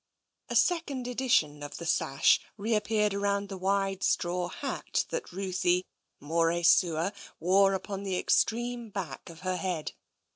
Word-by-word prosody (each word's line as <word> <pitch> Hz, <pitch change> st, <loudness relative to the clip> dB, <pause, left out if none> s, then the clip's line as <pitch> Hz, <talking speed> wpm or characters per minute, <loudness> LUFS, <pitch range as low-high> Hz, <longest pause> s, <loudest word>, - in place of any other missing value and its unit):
A -, -, -3 dB
second 295 Hz, -8 st, +1 dB
edition 235 Hz, -, +1 dB
of 145 Hz, -, -7 dB
the 170 Hz, -, -7 dB
sash 135 Hz, -3 st, +3 dB, 0.2 s
reappeared 210 Hz, -1 st, +1 dB
round 200 Hz, 0 st, 0 dB
the 195 Hz, -, -5 dB
wide 195 Hz, 0 st, 0 dB
straw 175 Hz, 0 st, 0 dB
hat 270 Hz, +8 st, -3 dB
that -, -, -4 dB
Ruthie, 185 Hz, -1 st, 0 dB, 0.3 s
more 165 Hz, +3 st, +1 dB
sua, 170 Hz, +1 st, +4 dB, 0.3 s
wore 195 Hz, +2 st, +4 dB
upon 195 Hz, +1 st, -5 dB
the 190 Hz, -2 st, -2 dB
extreme 240 Hz, +3 st, +1 dB
back 195 Hz, -5 st, -6 dB
of 165 Hz, 0 st, -12 dB
her 185 Hz, 0 st, -1 dB
head. 180 Hz, -5 st, -3 dB
195 Hz, 140 wpm, -29 LUFS, 175-210 Hz, 0.3 s, sua